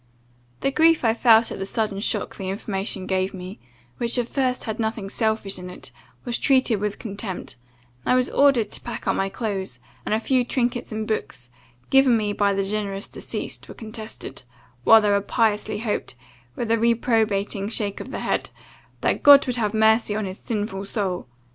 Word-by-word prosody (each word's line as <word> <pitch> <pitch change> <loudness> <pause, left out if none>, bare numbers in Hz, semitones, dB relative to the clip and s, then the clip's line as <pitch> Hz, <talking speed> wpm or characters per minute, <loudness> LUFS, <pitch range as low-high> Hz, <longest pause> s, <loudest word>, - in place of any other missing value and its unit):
"The 275 - +1
grief 320 -1 +4
I 225 - +4
felt 230 -1 +5
at - - -6
the 195 - -2
sudden 210 -3 -1
shock 210 0 -2
the 190 -1 -5
information 195 -1 -3
gave 190 0 -1
me, 185 +2 -8 0.4
which 235 +1 +1
at 240 -1 0
first 255 -2 0
had 220 -1 -4
nothing 220 -3 -2
selfish 220 -4 0
in 180 0 -7
it, 180 - -9 0.3
was 240 -2 -2
treated 260 -5 +3
with 210 0 -2
contempt, 200 -3 -5 0.5
and - - 0
I - - +5
was 255 -1 +3
ordered 270 -7 +3
to - - -2
pack 240 - -6
up - - +1
my 195 0 0
clothes; 195 - -4 0.2
and - - 0
a - - +1
few 255 +2 +2
trinkets 245 -1 -1
and 215 0 -3
books, 125 - -4 0.4
given 270 -3 +6
me 210 -1 -1
by 205 0 +2
the 195 0 0
generous 200 0 -3
deceased, - - -5
were - - -9
contested, 215 - -7 0.4
while 225 0 +8
they 205 -1 +3
piously 210 0 0
hoped, 210 - -3 0.4
with 230 -2 -2
a 230 - +3
reprobating 220 -4 +1
shake 210 -3 0
of - - -7
the - - -5
head, - - -1 0.5
'that - - +1
God 285 -1 +8
would 250 -1 -1
have 215 -2 -1
mercy 220 0 +3
on 215 -1 -1
his 190 0 -6
sinful 205 -3 -3
soul! 195 - -3
215 Hz, 185 wpm, -23 LUFS, 200-235 Hz, 0.5 s, while